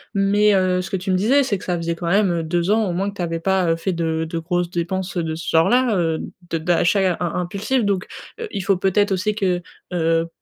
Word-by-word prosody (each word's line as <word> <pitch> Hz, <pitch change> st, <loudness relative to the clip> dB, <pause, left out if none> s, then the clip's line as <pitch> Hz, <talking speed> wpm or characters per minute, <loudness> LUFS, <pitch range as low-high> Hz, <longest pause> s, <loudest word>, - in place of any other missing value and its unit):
Mais, 205 Hz, +1 st, +3 dB
heu, 185 Hz, -1 st, +2 dB
ce 185 Hz, -, -7 dB
que 190 Hz, -, -1 dB
tu 190 Hz, +1 st, -3 dB
me -, -, +3 dB
disais, 250 Hz, +10 st, +3 dB
c'est 220 Hz, -6 st, -1 dB
que -, -, -12 dB
ça 180 Hz, -1 st, -1 dB
faisait 170 Hz, 0 st, -2 dB
quand 170 Hz, 0 st, -5 dB
même, 195 Hz, +1 st, +3 dB
heu, 165 Hz, -1 st, -1 dB
2 175 Hz, +3 st, 0 dB
ans, 220 Hz, 0 st, +3 dB
au -, -, -1 dB
moins 195 Hz, +3 st, -1 dB
que -, -, -17 dB
tu 190 Hz, -, -5 dB
avais 165 Hz, -1 st, -2 dB
pas, 190 Hz, 0 st, +1 dB
heu, -, -, +2 dB
fait 185 Hz, +2 st, -2 dB
de 160 Hz, -1 st, -1 dB
de 165 Hz, -, -3 dB
grosses 175 Hz, +1 st, -1 dB
dépenses 180 Hz, +2 st, -3 dB
de 160 Hz, -2 st, -1 dB
ce 165 Hz, -, -8 dB
genre-là, 235 Hz, +8 st, +3 dB
heu, 165 Hz, -3 st, 0 dB, 0.3 s
de 165 Hz, -, -1 dB
d'achat 175 Hz, +3 st, +2 dB
im -, -, -7 dB
im 175 Hz, -2 st, -2 dB
impulsif. 205 Hz, +7 st, -1 dB
Donc, 195 Hz, -1 st, -1 dB, 0.3 s
heu, 460 Hz, -, -4 dB
il 195 Hz, -, -3 dB
faut 195 Hz, 0 st, +1 dB
peut-être 195 Hz, +2 st, +2 dB
aussi 210 Hz, +3 st, -1 dB
que, 185 Hz, -4 st, 0 dB, 0.3 s
heu, 165 Hz, -1 st, +1 dB
180 Hz, 260 wpm, -21 LUFS, 170-200 Hz, 0.3 s, Mais